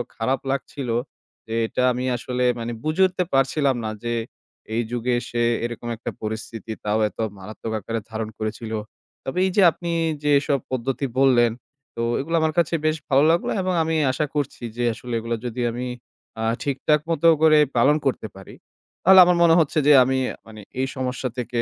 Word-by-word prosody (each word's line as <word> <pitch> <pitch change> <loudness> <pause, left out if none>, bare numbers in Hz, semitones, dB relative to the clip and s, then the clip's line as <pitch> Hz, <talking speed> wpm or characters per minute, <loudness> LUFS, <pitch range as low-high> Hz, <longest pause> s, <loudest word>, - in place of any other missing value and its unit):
খারাপ 130 +3 0
লাগছিল, 135 -1 -4 0.6
যে 110 - -5
এটা 125 - -1
আমি 125 +1 -3
আসলে, 125 +1 -3 0.2
মানে, 115 +1 -4
বুঝে 155 +4 0
উঠতে 185 0 -2
পারছিলাম 135 0 +2
না - - -1
যে, 120 - -1 0.6
এই 115 - +1
যুগে 125 +1 -1
এসে 120 -1 -2 0.2
এরকম 120 0 -6
একটা 120 - -5
পরিস্থিতি, 110 +1 -6
তাও 105 +1 +1
এত - - -27 0.2
মারাত্মক 110 +3 -7
আকারে 115 +3 -3
ধারণ 110 0 -3
করেছিল। 110 +1 -4 0.5
তবে 135 - -4
এই 190 - 0
যে - - +6
আপনি 170 +1 -5 0.3
যেসব 140 -1 +2
পদ্ধতি 130 +2 -2
বললেন, 120 -3 +5 0.4
তো 115 - -3 0.2
ওগুলা 165 +4 -1
আমার 160 -1 +1
কাছে 170 0 +1
বেশ 155 0 +2
ভালো 135 +1 +4
লাগলো। 170 - 0
এবং 185 0 -1
আমি 160 0 -1 0.2
আশা 150 +4 -1
করছি 145 -4 -3
যে, 120 - -1
আসলে 120 +2 -8
এগুলো 115 +1 -2
যদি 120 +1 -3
আমি 125 +2 -4 0.5
আ - - -1 0.2
ঠিকঠাক 145 +2 +1
মতো 165 0 +2
করে 155 -1 +6 0.2
পালন 140 +6 +5
করতে 125 - -1
পারি, 95 - -12 0.5
তাহলে 190 +1 +8
আমার 175 0 +3
মনে 165 -1 +6
হচ্ছে 155 0 +1
যে, 150 - +8
আমি, 130 +1 0 0.3
মানে, 110 -1 -11 0.2
এই 135 - +1
সমস্যা 130 0 -3
থেকে, 120 -1 -2
130 Hz, 180 wpm, -23 LUFS, 115-150 Hz, 0.6 s, তাহলে